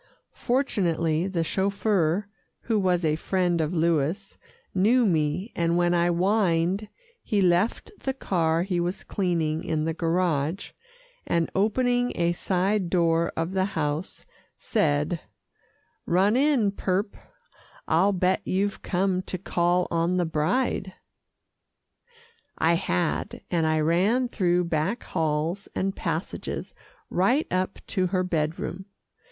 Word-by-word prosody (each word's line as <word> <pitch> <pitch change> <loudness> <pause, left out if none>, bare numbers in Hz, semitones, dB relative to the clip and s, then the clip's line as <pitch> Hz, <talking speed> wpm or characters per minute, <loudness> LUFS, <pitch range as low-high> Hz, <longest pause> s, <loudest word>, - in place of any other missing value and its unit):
Fortunately 175 - 0
the 180 -4 -1
chauffeur, 195 0 0 0.3
who 225 -3 0
was 180 -3 +1
a 155 -1 +2
friend 175 0 0
of 155 0 -1
Louis, 170 +3 0 0.4
knew 230 +6 +4
me, 165 +3 0
and 170 0 +1
when 175 0 +2
I 170 0 +3
whined, 185 +1 +1 0.3
he 210 - 0
left 185 - +1
the 265 -1 -3
car 165 -8 +1
he 180 -2 -1
was 175 +3 -2
cleaning 165 -4 -1
in 155 -4 -1
the 165 - -1
garage, 165 0 -1 0.6
and 170 -1 0
opening 245 +4 +1
a 170 0 +1
side 185 +2 0
door 170 -2 +2
of 165 +2 -1
the 190 -1 +1
house, 150 +2 -3 0.3
said, 75 0 0 0.9
"Run 195 +5 +3
in, 265 -7 +3
purp 195 +1 -1 0.7
I'll 180 +5 +3
bet 185 0 +1
you've 200 +2 -1
come 185 0 0
to 185 - -5
call 175 0 +1
on 170 +2 +1
the 175 - +1
bride." 185 +5 -1 1.6
I 165 +1 +3
had, 85 - -1
and 165 -3 +2
I 155 0 +2
ran 190 +11 +2
through 180 -6 +1
back 170 +7 -1
halls 160 +4 -1
and 195 +1 -1
passages - - -4 0.4
right 240 - +2
up 185 +1 -1
to 185 -3 +1
her 185 0 0
bed 160 -3 -1
room. 190 +2 -5
180 Hz, 125 wpm, -26 LUFS, 165-195 Hz, 1.6 s, knew